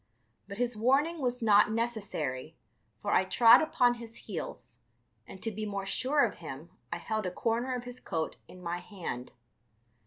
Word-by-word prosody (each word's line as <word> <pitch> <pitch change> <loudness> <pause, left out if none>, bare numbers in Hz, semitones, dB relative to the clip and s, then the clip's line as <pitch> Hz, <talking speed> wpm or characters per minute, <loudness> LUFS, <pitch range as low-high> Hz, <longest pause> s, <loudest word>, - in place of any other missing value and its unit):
But 200 0 -7
his 245 0 0
warning 280 +9 +2
was 245 -2 0
not 210 -1 +6
necessary, 195 - -2 0.5
for - - -1
I - - +5
trod 230 +5 +7
upon 250 -6 +3
his 230 -1 -10
heels, - - -6 0.5
and 190 - -11
to 225 - -1
be 215 +1 -5
more 200 -2 -3
sure 260 +7 +2
of 220 - -5
him 155 0 -8 0.2
I 170 - -1
held 215 +3 -2
a - - -2
corner 235 +6 0
of 245 - -4
his 245 0 -6
coat 160 -1 -3
in 180 0 -13
my 175 0 -2
hand. 175 - -6
220 Hz, 175 wpm, -30 LUFS, 180-245 Hz, 0.5 s, trod